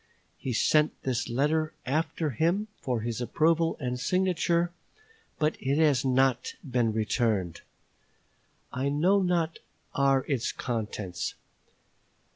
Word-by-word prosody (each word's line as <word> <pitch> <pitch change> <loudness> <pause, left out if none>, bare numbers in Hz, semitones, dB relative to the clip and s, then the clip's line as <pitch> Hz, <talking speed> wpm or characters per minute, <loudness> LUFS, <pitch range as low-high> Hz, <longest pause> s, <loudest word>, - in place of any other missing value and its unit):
He 130 - -3
sent 150 +6 +2
this 125 -2 -1
letter 155 +5 +1
after 155 +2 -1
him 175 - 0
for 125 -4 -1
his 115 +1 -3
approval 165 +6 +2
and 125 -3 -3
signature; 175 +2 +1 0.7
but 155 0 +1
it 135 +2 0
has 150 -5 +3
not 130 -1 +2
been 120 -3 +1
returned. 110 -5 0 1.1
I 130 +2 0
know 180 +8 +3
not 170 -3 0 0.3
what - - -2
are 135 -1 +3
its 130 -5 0
contents. 105 -7 -3
135 Hz, 115 wpm, -28 LUFS, 120-160 Hz, 1.1 s, has